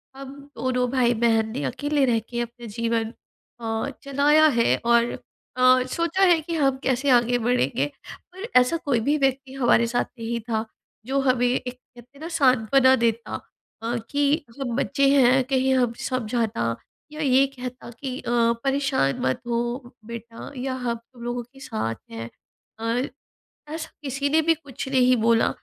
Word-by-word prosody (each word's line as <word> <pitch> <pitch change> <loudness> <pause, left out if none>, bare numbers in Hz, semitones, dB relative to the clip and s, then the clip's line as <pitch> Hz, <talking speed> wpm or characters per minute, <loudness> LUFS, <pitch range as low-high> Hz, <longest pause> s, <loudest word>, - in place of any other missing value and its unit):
हम 270 0 -8 0.3
दोनों 250 -1 0
भाई-बहन 235 -3 +2
ने 145 - -4
अकेले 285 - 0
रहके 240 -1 -1
अपने 240 0 -7
जीवन 230 +1 -2 0.5
अ, 225 +3 -2
चलाया 285 +3 +4
है 230 - +4
और 235 0 +4 0.5
अ, 255 0 +5
सोचा 335 +8 0
है 350 -3 +6
कि 335 +2 -5
हम 275 -4 +2
कैसे 265 +2 +1
आगे 245 +1 0
बढ़ेंगे 140 - +1 0.5
और 380 +5 -7
ऐसा 250 +6 +4
कोई 285 -7 0
भी 295 +2 +2
व्यक्ति 270 -1 0
हमारे 240 -3 +3
साथ 240 +1 0
नहीं 230 +1 -2
था 220 -1 0 0.4
जो 270 +3 0
हमें 250 -2 +2
एक 250 0 -1
कहते 245 -1 -19
हैं - - -16
ना 320 - -5
सांत्वना 260 0 +4
देता 230 0 -1 0.5
अ, 230 +1 -2
कि 290 +1 +1
हम 245 -4 -2
बच्चे 275 +1 +1
हैं 260 0 +5
कहीं 265 -1 +2
हम 245 -3 +2 0.2
समझाता 230 - -1 0.4
या 305 +1 -6
ये 270 -2 +4
कहता 250 -1 -7
कि 265 -2 -4
अ, - - -6 0.3
परेशान 270 - +1
मत 130 0 0
हो 235 -1 0 0.5
बेटा 235 +1 -8
या 260 +1 -2
हम 245 -2 -2
तुम 235 +1 -16
लोगों 240 0 -3
के 260 +3 -19
साथ 215 - -3 0.2
हैं। 115 0 -6 0.5
अ, - - -7 0.9
ऐसा 320 0 -5
किसी 275 0 -1
ने 315 +2 +4
भी 330 +1 +4
कुछ 285 -4 -8
नहीं 255 -1 +4
बोला 225 0 +3
250 Hz, 160 wpm, -24 LUFS, 235-275 Hz, 0.9 s, है